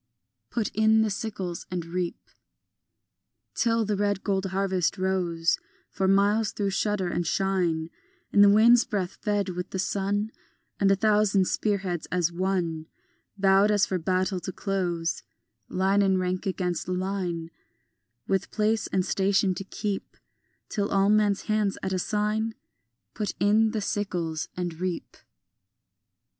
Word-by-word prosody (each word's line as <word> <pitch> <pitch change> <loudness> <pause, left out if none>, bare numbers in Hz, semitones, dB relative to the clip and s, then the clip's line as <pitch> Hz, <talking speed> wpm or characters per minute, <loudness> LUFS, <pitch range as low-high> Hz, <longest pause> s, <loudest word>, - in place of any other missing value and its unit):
Put 225 -4 -1
in 220 +1 +4
the 215 - 0
sickles 195 -4 -4
and 175 -2 -3
reap. 175 0 -3 1.4
Till 230 -1 +1
the 210 0 0
red 205 -1 0
gold 195 -1 0
harvest 190 -1 0
rows 180 -3 0 0.3
For 190 0 0
miles 200 +2 +3
through 200 -2 -1
shudder 195 -2 0
and 175 -1 -2
shine 175 -4 0 0.4
In 205 - +5
the 205 - +8
wind's 225 +3 +6
breath, 190 -4 -3
fed 205 -3 0
with 180 0 -4
the - - -4
sun, 200 +3 -1 0.5
A 195 0 +4
thousand 210 -2 +3
spear 210 -2 +1
heads 180 -4 -4
as 175 -2 +1
one 170 -3 -1 0.5
Bowed 195 +1 +4
as 205 -2 +3
for 185 - -2
battle 185 +2 0
to 190 - -5
close 175 -5 -2 0.5
Line 195 +2 +2
in 190 -1 +3
rank 185 +1 -2
against 180 -2 -2
line 180 -3 -2 0.8
With 195 -1 0
place 215 0 0
and 185 -1 0
station 195 0 +2
to 185 - -5
keep 200 0 -4 0.5
Till 205 -2 -2
all 195 0 +3
men's 210 -2 +2
hands 215 -2 0
at 190 - -1
a 185 - 0
sign 215 +3 -1 0.6
Put 210 -2 -3
in 215 +2 +4
the 215 0 -2
sickles 180 -6 -2
and 175 -2 -2
reap. 180 -2 -4
195 Hz, 140 wpm, -26 LUFS, 180-205 Hz, 1.4 s, the